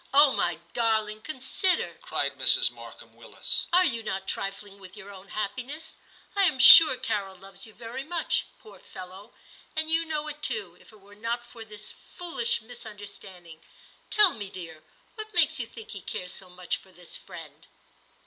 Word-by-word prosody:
*0h, 285 -1 +8
my - - 0
darling, 220 -2 +1
consider,' 310 - -1
cried - - -1
Mrs. - - +5
Markham - - -13
Willis; - - -1
* - - -28
are 365 +1 +6
you 235 -8 0
not 190 -3 -3
trifling 195 +1 -4
with 190 +2 -12
your 200 -1 -10
own 195 0 -12
happiness 255 +11 -4 0.4
"i 400 - +3
I - - +5
am 305 -7 +2
sure 270 +2 +10
Carol 200 -5 -2
loves 195 +3 -10
you 220 - -15
very 240 +3 -6
much, 330 +3 0
poor 440 - -15
fellow; 190 +4 -11 0.4
and 315 0 0
you 330 +1 +3
know 305 -2 -2
it 300 0 -7
too, 215 - -2
if - - -18
it 215 -2 -19
were 200 +1 -17
not 230 +3 -3
for 235 -1 -11
this 210 -1 -6
foolish 335 -11 -2
misunder 220 -3 -9
standing. 175 -5 -11 0.5
Tell 415 -4 +5
me, 205 -3 -6
dear, 165 -5 -9 0.3
what 435 -1 -9
makes - - +4
you - - -2
think 450 0 -10
he - - -7
cares 180 0 -5
so 185 - -4
much 180 0 -3
for 190 - -19
this 180 -1 -9
friend - - -11
220 Hz, 185 wpm, -27 LUFS, 195-300 Hz, 0.5 s, sure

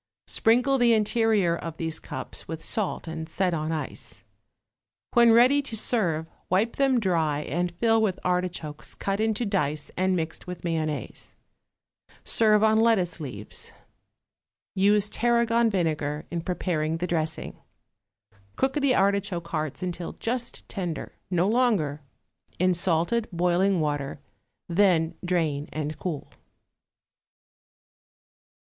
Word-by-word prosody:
Sprinkle 250 +4 +3
the 240 -1 +5
interior 215 -5 +2
of 165 -1 -6
these 160 -1 -1
cups - - -6
with 160 0 -6
salt 205 -5 -1
and 160 0 -5
set 180 +1 0
on 155 0 -2
ice. 155 -2 -5 0.9
When 235 -1 +6
ready 250 +5 +6
to 250 -5 -5
serve, 175 -9 +1 0.2
wipe 205 +6 +1
them 270 -3 +3
dry 160 -7 +1
and 175 +5 -1
fill 225 +4 +2
with 190 -4 0
artichokes 180 -4 -2
cut 195 +1 -2
into 220 +1 0
dice 155 -7 -1
and 185 +1 +1
mixed 165 0 -4
with 180 0 -7
mayonnaise. 160 -3 -3 0.9
Serve 215 -2 +4
on 220 0 +4
lettuce 195 -7 +2
leaves. 120 -9 -5 1.0
Use 205 +2 +3
tarragon 235 0 +2
vinegar 155 -6 -1
in 170 -1 -2
preparing 165 -3 -1
the 175 - -2
dressing. 160 -3 -2 1.0
Cook 265 0 +1
the 280 -4 +2
artichoke 195 -3 +1
hearts 155 +1 -3
until 175 -1 -4
just 240 +1 -4
tender, 175 -6 -4 0.2
no 180 0 +2
longer, 205 - +1 0.6
in 185 +1 +3
salted 175 +6 0
boiling 180 +2 +2
water, 145 -2 -2 0.5
then 170 -3 +3
drain 160 -5 0
and 155 0 -3
cool. 165 -6 -4
180 Hz, 120 wpm, -26 LUFS, 160-220 Hz, 1.0 s, When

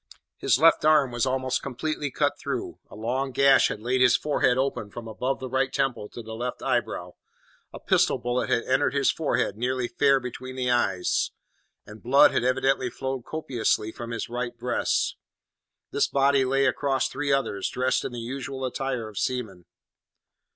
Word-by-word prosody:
His - - +3
left 165 +4 +5
arm 150 -4 +4
was 120 +2 0
almost 130 0 -1
completely 145 +3 -3
cut - - +1
through; - - -4
a - - -12
long 125 +5 -2
gash 140 +2 +5
had - - -5
laid 125 +2 +1
his 125 -1 +6
forehead 140 -4 +1
open 130 -6 -1
from 115 +2 -8
above 125 +5 -2
the 130 - -5
right 130 +1 0
temple 135 -7 -1
to 120 - -9
the 110 0 -8
left 120 +2 -5
eyebrow; - - -1 0.6
a - - -9
pistol - - +2
bullet 120 +1 -2
had 120 - +2
entered 140 +1 +1
his 140 -1 +3
forehead 145 -9 -1
nearly 125 +1 -1
fair 135 +3 +3
between 130 +1 -7
the 125 -1 0
eyes; 95 -7 +1 0.6
and 105 +1 -12
blood 130 +4 +6
had - - 0
evidently 130 0 +1
flowed 130 0 -5
copiously 120 -7 -1
from 120 +1 -8
his 115 -1 -4
right 120 0 -4
breast. 120 +1 0 0.7
This - - +2
body 140 -1 +3
lay 135 +1 +2
across 135 +1 +1
three 145 0 -2
others, 120 -8 0
dressed 130 +1 0
in - - -4
the 120 - -6
usual 130 +2 -5
attire 130 -3 -3
of 105 -2 -6
seamen. 110 -9 -3
130 Hz, 175 wpm, -26 LUFS, 120-135 Hz, 0.7 s, his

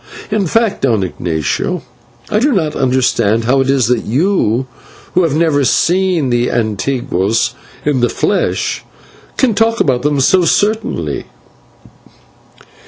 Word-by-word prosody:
In 205 -3 0
fact, 225 +4 +1
Don 115 -7 +1
Ignatio, 90 - -2 0.5
I 210 - +2
do 285 +6 +2
not 160 -7 0
understand 120 -4 +1
how 135 +4 +2
it 135 - -1
is 135 -3 +3
that 120 0 0
you, 130 - +1 0.5
who 180 - +3
have 160 -5 +1
never 155 -3 +2
seen 175 0 +1
the 120 0 +1
/antiguos/ 110 -1 -1 0.3
in 145 -3 +1
the 120 - +2
flesh, - - -1 0.5
can 255 -4 +2
talk 225 +2 +1
about 130 -4 +1
them 145 +1 0
so 180 +7 +4
certainly." 215 +5 0
135 Hz, 130 wpm, -15 LUFS, 120-185 Hz, 0.5 s, so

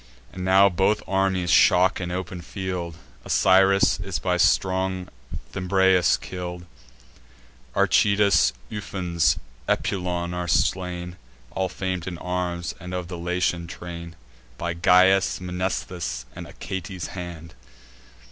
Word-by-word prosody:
And 95 - -6
now 95 +1 +6
both 95 +3 +1
armies 95 -2 +1
shock 90 +4 +5
in 90 - -3
open 90 0 -4
field; 90 -2 -5 0.3
Osiris 95 +1 +4
is 95 -3 -3
by 90 +5 0
strong 95 +1 +1 0.4
Thymbraeus 95 -1 +3
kill'd. 90 -1 -6 1.1
Archetius, 100 -9 +4 0.2
Ufens, 90 -8 0 0.3
Epulon, 90 -2 -1
are 90 0 -3
slain 90 +1 -1 0.3
(All 95 +5 -1
fam'd 95 -1 -4
in 90 -2 -4
arms, 90 -1 -3
and 90 +1 -6
of 90 -1 -4
the 90 - -5
Latian 90 0 -1
train) 85 -1 -8 0.4
By 85 0 -2
Gyas', 90 +3 +4
Mnestheus', 90 -6 -3
and - - -8
Achates' 95 -2 -6
hand. 85 -3 -8
90 Hz, 110 wpm, -24 LUFS, 85-95 Hz, 1.1 s, now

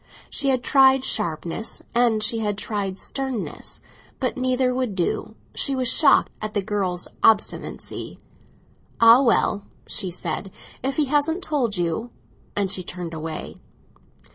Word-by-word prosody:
She 280 -2 +1
had 255 -2 +1
tried 265 -1 +5
sharpness, 175 +1 -2
and 235 -3 +3
she 225 +1 +2
had 210 -2 -1
tried 200 -3 -3
sternness: 265 -3 -4 0.4
but 255 -2 -1
neither 255 0 +1
would 250 -5 -2
do; 175 -2 -2 0.2
she 275 - +2
was 255 -1 0
shocked 295 -3 +5
at 215 0 -5
the 205 - +1
girl's 185 -3 -2
obstinacy. 220 -1 0 0.8
"Ah, 230 +3 +8
well," 225 -5 +2 0.2
she 190 -4 -2
said, 175 +2 -4 0.3
"if 270 +1 -2
he 305 - +2
hasn't 295 +6 +1
told 245 -9 0
you!... 175 +7 -1 0.2
" - - -33
and 195 -2 0
she 185 - 0
turned 175 -1 -6
away. 160 0 -6
225 Hz, 140 wpm, -23 LUFS, 190-260 Hz, 0.8 s, Ah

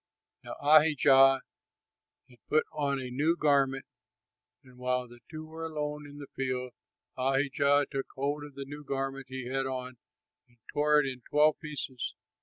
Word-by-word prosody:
Now - - -7
Ahijah 140 -3 +6 0.9
had 125 -2 -20
put 155 - +3
on 140 -2 0
a 125 -1 -6
new 155 +7 +1
garment, 135 -3 +2 0.8
and 130 -1 -18
while 125 0 -1
they 120 0 -15
two 155 0 -7
were 160 +1 -8
alone 150 -2 -4
in 145 0 -12
the 145 - -7
field, 130 -1 -2 0.5
Ahijah 140 +2 +2
took 135 -2 -3
hold 145 +2 -2
of 145 -2 -11
the 140 0 -6
new 145 +2 -9
garment 135 -1 -3
he 130 -1 -5
had 135 +1 -1
on 130 -1 -5 0.5
and 120 - -29 0.2
tore 150 0 +4
it - - -2
in 130 -2 -5
twelve 150 +1 +4
pieces. 145 -4 -5
135 Hz, 160 wpm, -30 LUFS, 130-150 Hz, 0.9 s, Ahijah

